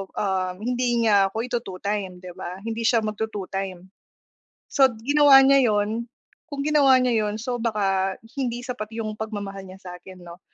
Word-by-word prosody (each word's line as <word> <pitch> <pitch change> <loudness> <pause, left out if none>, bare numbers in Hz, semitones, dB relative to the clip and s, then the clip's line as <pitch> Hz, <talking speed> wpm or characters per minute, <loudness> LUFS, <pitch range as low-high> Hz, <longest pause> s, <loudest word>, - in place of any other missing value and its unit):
ah 185 -2 -1
hindi 240 +3 -1
nya 200 -3 +4
ako 220 +4 -4
ito-two-time 200 -5 -4
'di 180 - -8
ba? 180 0 -7
Hindi 225 0 -2
siya 230 -3 +3
magto-two-time. 195 -4 -4 0.9
So 270 -2 +5 0.2
ginawa 285 0 +7
niya 270 -1 +5
'yon 215 +2 0 0.4
kung 285 -3 -5
ginawa 285 -3 +5
niya 230 -4 +1
'yon, 210 - -3
so, 245 +1 -3
baka 195 -4 0 0.2
hindi 245 -3 -2
sapat 245 -4 -5
yung 215 -2 -4
pagmamahal 200 -3 -5
niya 190 +1 -13
sa 180 - -8
akin 185 -1 -13
'no. 170 0 -12
215 Hz, 160 wpm, -24 LUFS, 195-245 Hz, 0.9 s, ginawa